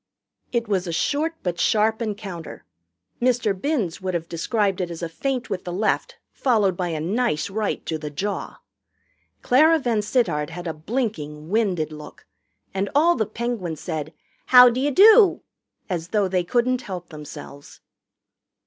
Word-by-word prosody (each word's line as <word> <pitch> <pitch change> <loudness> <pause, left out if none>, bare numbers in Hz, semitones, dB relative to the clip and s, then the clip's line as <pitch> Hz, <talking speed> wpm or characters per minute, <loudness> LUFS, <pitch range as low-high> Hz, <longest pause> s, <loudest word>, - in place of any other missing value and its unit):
It 235 -2 -1
was 190 -3 0
a - - -2
short 300 - 0
but 175 -2 -2
sharp 220 +1 +2
encounter 200 -6 -6 0.6
Mr. 240 -4 +2
Binns 200 - -2
would 185 -1 -2
have 165 -1 -3
described 195 +3 -1
it 175 - -2
as 170 0 -7
a - - -1
feint 250 - -3
with 185 -2 -3
the 175 - -5
left 200 +5 -1 0.2
followed 215 -8 +2
by 180 0 -2
a 160 -2 -3
nice 200 +1 -1
right 210 0 -2
to 160 -1 -3
the 150 -1 -5
jaw. 200 +8 -4 0.9
Clara 315 +6 +5
VanSittart 220 - 0
had 175 +1 -8
a 165 - -2
blinking, 155 - -4
winded 190 -7 0
look, 150 0 -11 0.5
and 195 +1 -1
all 335 +4 +5
the 220 - -1
Penguins 215 -8 -4
said, 155 -3 -4 0.4
"How 250 -1 +9
d'you 260 +4 0
do?" 410 - +6 0.4
as 170 -4 -3
though 205 0 +1
they 185 -1 0
couldn't 245 +6 +1
help 180 -6 -7
themselves. 150 -2 -11
200 Hz, 155 wpm, -23 LUFS, 170-240 Hz, 0.9 s, How